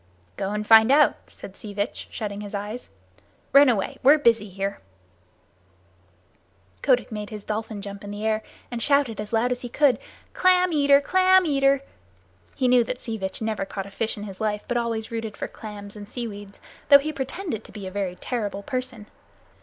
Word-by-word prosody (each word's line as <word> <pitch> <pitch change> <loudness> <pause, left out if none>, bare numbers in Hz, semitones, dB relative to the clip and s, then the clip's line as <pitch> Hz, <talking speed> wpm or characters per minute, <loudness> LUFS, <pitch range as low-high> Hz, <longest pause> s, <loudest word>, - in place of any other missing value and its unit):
"Go 195 - -3
and 210 +1 -3
find 220 +2 +7
out," 295 +2 +5
said 195 - -12
Sea 205 -2 -9
Vitch, 205 +2 -3
shutting 205 -2 -5
his 205 0 -6
eyes. 210 +4 -5 0.6
"Run 280 0 +8
away. 245 +4 -1
We're 280 +4 +7
busy 230 -7 +2
here." 195 +1 -4 2.0
Kotick 255 -3 +2
made 210 -1 -5
his 210 -2 -8
dolphin 215 -1 -4
jump 200 0 -8
in 205 - -7
the 205 +1 -5
air 220 0 +1 0.3
and 240 -1 -4
shouted 280 -6 +2
as 210 - -8
loud 235 +2 +1
as 245 - -2
he 245 - -6
could: 280 +1 +3 0.3
"Clam 365 -1 +4
eater! 285 -1 +5
Clam 375 +4 +4
eater!" 275 -2 +2 0.7
He 255 - +1
knew 250 -1 +5
that 250 +2 -5
Sea 225 -2 -5
Vitch 190 +3 -4
never 220 -2 -1
caught 195 0 -5
a 200 - -11
fish 220 +3 -2
in 205 - -6
his 195 -1 -8
life 210 -1 -1
but 240 - -2
always 230 -1 -2
rooted 225 -2 -4
for - - -3
clams 205 -1 -9
and 205 -1 -10
seaweed; 205 -5 -7 0.3
though 280 - +11
he 305 +2 -4
pretended 270 - -4
to - - -14
be 205 -3 -8
a 185 - -6
very 190 -2 -3
terrible 205 -3 -4
person. 255 -4 -4
225 Hz, 190 wpm, -24 LUFS, 205-260 Hz, 2.0 s, though